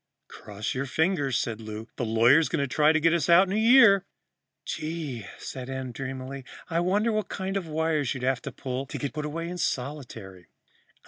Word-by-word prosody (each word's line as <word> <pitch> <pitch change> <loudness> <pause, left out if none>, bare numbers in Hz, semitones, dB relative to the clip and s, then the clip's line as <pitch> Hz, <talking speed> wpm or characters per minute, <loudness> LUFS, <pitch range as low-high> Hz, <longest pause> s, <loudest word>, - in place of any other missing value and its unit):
"Cross 105 0 -6
your 135 +1 -3
fingers," 145 -4 +1
said 115 -1 -3
Lou. 110 +1 -7
"The 120 - -2
lawyer's 115 +8 +4
going 150 -4 0
to - - -1
try 150 +4 +3
to 155 - +2
get 165 +1 +3
us 170 -1 0
a 170 +3 +7
year." 220 -3 +6 0.6
"Gee!" 155 - -4
Em - - -10
said 130 -1 -6
dreamily. 130 +1 -6 0.3
"I 165 - +1
wonder 200 +6 +1
what 215 -1 -2
kind 190 0 -4
of 190 -4 -2
wires 155 -3 0
you'd 130 - -6
have 130 -1 +1
to 135 - -6
pull 130 +1 -5
to - - -6
get 140 - -4
put 150 -1 -4
away 165 +3 -4
in 180 +1 -6
solitary?" 120 - -4
140 Hz, 190 wpm, -27 LUFS, 125-165 Hz, 0.6 s, a